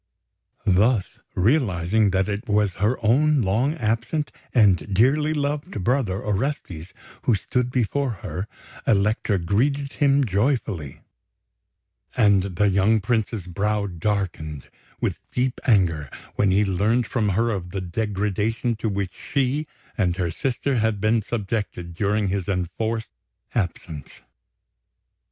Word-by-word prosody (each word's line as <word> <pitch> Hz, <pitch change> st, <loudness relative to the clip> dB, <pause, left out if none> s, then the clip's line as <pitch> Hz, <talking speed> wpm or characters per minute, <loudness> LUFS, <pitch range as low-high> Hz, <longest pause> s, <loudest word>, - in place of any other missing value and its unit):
Thus 100 Hz, +3 st, +2 dB, 0.2 s
realising 105 Hz, -, +2 dB
that 95 Hz, 0 st, +1 dB
it 105 Hz, 0 st, -3 dB
was 105 Hz, -2 st, +2 dB
her 110 Hz, +5 st, +2 dB
own 145 Hz, +4 st, +4 dB
long 115 Hz, +10 st, +1 dB
absent 120 Hz, +4 st, -1 dB, 0.2 s
and 100 Hz, -5 st, +3 dB
dearly 135 Hz, +10 st, +3 dB
loved 145 Hz, -8 st, -2 dB
brother, 115 Hz, -4 st, +1 dB
Orestes, 95 Hz, -, -3 dB, 0.3 s
who 120 Hz, -, +3 dB
stood 125 Hz, +5 st, -1 dB
before 130 Hz, +3 st, 0 dB, 0.2 s
her, 90 Hz, +5 st, -4 dB, 0.4 s
Elektra 105 Hz, 0 st, +2 dB
greeted 135 Hz, -, 0 dB
him 140 Hz, -1 st, +3 dB
joyfully; 100 Hz, -, -1 dB, 1.2 s
and 100 Hz, -5 st, +5 dB
the 105 Hz, +4 st, +3 dB
young 100 Hz, +3 st, +3 dB
Prince's 110 Hz, -2 st, -1 dB
brow 100 Hz, +3 st, -1 dB
darkened 90 Hz, -6 st, -3 dB, 0.3 s
with -, -, -1 dB
deep 125 Hz, 0 st, -1 dB
anger 85 Hz, -, +3 dB, 0.2 s
when 100 Hz, -, +2 dB
he 100 Hz, +3 st, +3 dB
learned 105 Hz, +6 st, +1 dB
from 110 Hz, -2 st, 0 dB
her 115 Hz, +1 st, +2 dB
of 90 Hz, -4 st, -4 dB
the 95 Hz, -, -4 dB
degradation 105 Hz, +4 st, -1 dB
to 110 Hz, 0 st, -1 dB
which 100 Hz, -2 st, -2 dB
she 140 Hz, +3 st, -1 dB, 0.3 s
and 90 Hz, -6 st, +1 dB
her 90 Hz, -3 st, -1 dB
sister 130 Hz, -, -1 dB
had 110 Hz, -2 st, +1 dB
been 110 Hz, +2 st, +2 dB
subjected 105 Hz, -5 st, -3 dB
during 100 Hz, +2 st, 0 dB
his 95 Hz, -2 st, -2 dB
enforced 100 Hz, +5 st, -2 dB, 0.4 s
absence. 85 Hz, -, -4 dB
105 Hz, 125 wpm, -24 LUFS, 95-120 Hz, 1.2 s, and